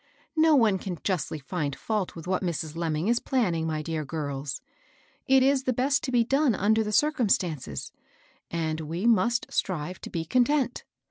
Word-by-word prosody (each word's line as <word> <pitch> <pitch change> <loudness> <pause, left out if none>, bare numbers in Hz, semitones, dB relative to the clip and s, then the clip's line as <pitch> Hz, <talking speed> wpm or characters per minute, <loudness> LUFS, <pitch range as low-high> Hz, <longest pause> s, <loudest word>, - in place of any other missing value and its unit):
No'one 275 -11 +4
can 180 -2 -5
justly 180 -5 -1
find 145 -1 -3
fault 210 -4 -2
with 165 - -8
what 185 0 0
Mrs. 160 -4 -3
Lemming 165 +1 -1
is 235 +1 +3
planning, 180 - 0
mj 155 -1 -2
dear 160 -1 -3
girls; 140 -2 -4 0.7
it 265 -1 +5
is 270 0 +2
the 255 - +2
best 270 +4 +1
thing - - -3
to - - -2
be 240 -2 +4
done 270 0 +2
under 220 +3 +2
the 210 - -3
circumstances, 195 - 0 0.6
and 160 -1 -2
we 165 +6 -4
must 235 +1 +3
strive 180 -1 -2
to - - -7
be 165 -1 -3
con 245 +9 +3
tent." 270 -3 0
185 Hz, 180 wpm, -27 LUFS, 160-245 Hz, 0.7 s, it